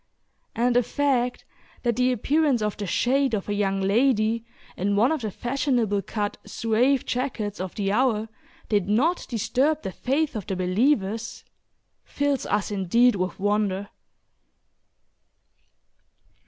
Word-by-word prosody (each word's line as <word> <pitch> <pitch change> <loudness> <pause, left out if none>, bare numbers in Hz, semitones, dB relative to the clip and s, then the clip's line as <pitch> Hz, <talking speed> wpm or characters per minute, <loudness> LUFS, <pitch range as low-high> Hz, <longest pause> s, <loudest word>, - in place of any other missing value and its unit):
and 240 +1 +1
the 245 - +6
fact 250 -1 0 0.4
that 240 -2 +1
the 255 0 +2
appearance 275 0 +1
of 210 -1 -1
"the 205 - -5
shade" 260 +5 +1
of 200 - -4
a 205 - -1
young 195 -1 0
lady 225 +2 +2 0.3
in 200 +2 0
one 230 +8 +3
of 315 -4 -1
the 220 - -2
fashionable 240 -3 0
cut 205 0 -3
Zouave 240 +4 +1
jackets 240 -5 -3
of 185 -1 -5
the 195 -2 -1
hour 225 -1 +1 0.4
did 205 -4 +1
not 295 +12 +1
disturb 265 +7 0
the 190 - -3
faith 280 +8 -1
of 210 - -5
the 190 - -2
believers, 210 +3 0 0.6
fills 285 -2 -1
us 205 0 0
indeed 210 +5 +3
with 185 0 -3
wonder. 205 -1 0
225 Hz, 135 wpm, -25 LUFS, 205-255 Hz, 0.6 s, the